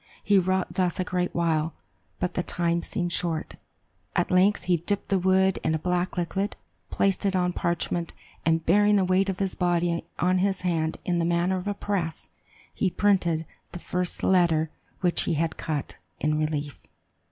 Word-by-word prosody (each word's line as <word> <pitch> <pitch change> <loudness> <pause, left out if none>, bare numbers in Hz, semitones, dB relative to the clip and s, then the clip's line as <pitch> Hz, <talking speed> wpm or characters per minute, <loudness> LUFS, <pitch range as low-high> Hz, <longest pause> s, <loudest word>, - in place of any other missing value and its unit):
He 200 -1 +5
wrought 185 0 0
thus 180 -1 0
a - - +2
great 180 -1 -2
while, 160 -2 +1 0.4
but 180 0 -1
the - - 0
time 170 -1 0
seemed 175 -1 -3
short. 165 -2 -2 0.6
At - - +1
length, 190 +3 +4
he 180 -1 +2
dipped 195 +5 -2
the 195 - +2
wood 190 +1 +3
in 160 - +1
a - - +1
black 180 +3 -1
liquid, 195 +3 -1 0.3
placed 195 0 +1
it 195 -1 +1
on 180 -1 +1
parchment, 170 0 -1 0.3
and 165 0 +1
bearing 205 +4 +4
the 195 -2 +3
weight 185 +2 +2
of 190 - -2
his 195 -1 -1
body 175 -1 0
on 185 +1 +2
his 195 0 0
hand 165 -3 0
in 175 -1 +1
the - - +1
manner 175 +2 +1
of 185 +2 -5
a 205 - -1
press, 185 -6 -3 0.4
he 190 - +1
printed 175 -5 +1 0.3
the - - -4
first 180 0 -3
letter 165 -4 +3 0.3
which 175 -2 +1
he - - 0
had 160 +1 0
cut, 150 -4 -4 0.2
in 150 0 +1
relief. 150 -2 -3
180 Hz, 180 wpm, -26 LUFS, 170-190 Hz, 0.6 s, He